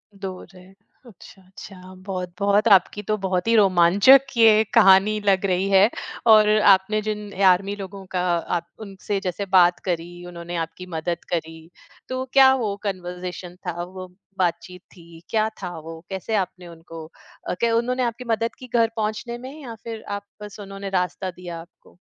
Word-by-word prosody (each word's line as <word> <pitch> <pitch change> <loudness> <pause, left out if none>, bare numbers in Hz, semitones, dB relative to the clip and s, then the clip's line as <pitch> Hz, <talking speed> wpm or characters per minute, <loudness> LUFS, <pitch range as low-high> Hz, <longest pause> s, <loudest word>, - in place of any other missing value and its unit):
दूर 190 -2 -7
रहे, 180 0 -16 0.4
अच्छा, 195 -3 -16
अच्छा। 185 -1 -12
बहुत-बहुत, 200 +3 0
आपकी 200 +1 +4
तो 215 - +1
बहुत 185 +2 -1
ही 230 - +3
रोमांचक 200 +6 +6 0.2
ये 220 -1 +6
कहानी 210 -1 +5
लग 195 0 +2
रही 185 +1 0
है, 195 +3 +5 0.4
और 215 -1 +7 0.2
आपने 210 +3 0
जिन 210 -1 -5
आर्मी 195 +3 +2
लोगों 195 -1 -9
का 180 -1 -1 0.4
आप 170 - -8 0.2
उनसे 195 +1 -4
जैसे 190 +2 -3
बात 180 -2 +4
करी, 175 0 -4
उन्होंने 175 0 -8
आपकी 180 +3 -12
मदद 170 +1 -3
करी, 160 0 -5 0.4
तो 255 0 -3
क्या 265 -1 +7
वो 215 -6 -2
कन्वर्ज़ेशन 180 -2 -6
था, 175 0 -3
वो 185 +1 -9 0.3
बातचीत 180 0 -2
थी, 170 -1 -15
क्या 220 -1 +1
था 175 -2 -6
वो? 160 +1 -9
कैसे 195 +3 -3
आपने 185 -2 -3
उनको 165 -1 -11 0.4
अ, - - 0
क्या 230 -1 +1
उन्होंने 250 +2 0
आपकी 235 +1 -3
मदद 230 +1 -1
की 255 - -10
घर 230 -1 +3
पहुँचने 220 +2 -3
में, 260 +2 -9
या 235 -4 -8
फिर 225 -2 -7
आप 200 - -11 0.2
बस 210 0 -10
उन्होंने 195 0 -7
रास्ता 180 +1 -4
दिया 175 -1 -8
आपको? 170 - -20
190 Hz, 165 wpm, -23 LUFS, 180-215 Hz, 0.4 s, और